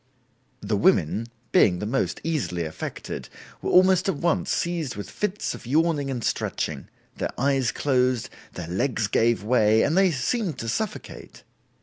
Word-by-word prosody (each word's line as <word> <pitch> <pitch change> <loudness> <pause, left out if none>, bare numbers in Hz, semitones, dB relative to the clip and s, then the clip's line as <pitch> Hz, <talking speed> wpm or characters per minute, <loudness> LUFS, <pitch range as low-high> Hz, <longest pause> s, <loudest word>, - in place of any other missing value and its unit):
The - - -1
women, 105 +9 +2 0.2
being 90 -3 +5
the 105 - -4
most 130 +6 -1
easily 130 - -1
affected, 80 - -6 0.3
were - - -2
almost 185 +1 +5
at - - 0
once 165 +3 0
seized 170 -6 -1
with 100 -2 -6
fits 210 0 -2
of - - -10
yawning 150 0 +1
and 125 -4 -3
stretching; - - -2 0.3
their - - -2
eyes 135 -2 +1
closed, 130 -4 +1 0.3
their 90 - -6
legs 110 +5 0
gave 115 +1 +2
way 110 -1 +4
and 155 - +1
they 190 0 +5
seemed 170 - -1
to 115 - -4
suffocate. 215 - -5
130 Hz, 150 wpm, -25 LUFS, 110-165 Hz, 0.3 s, being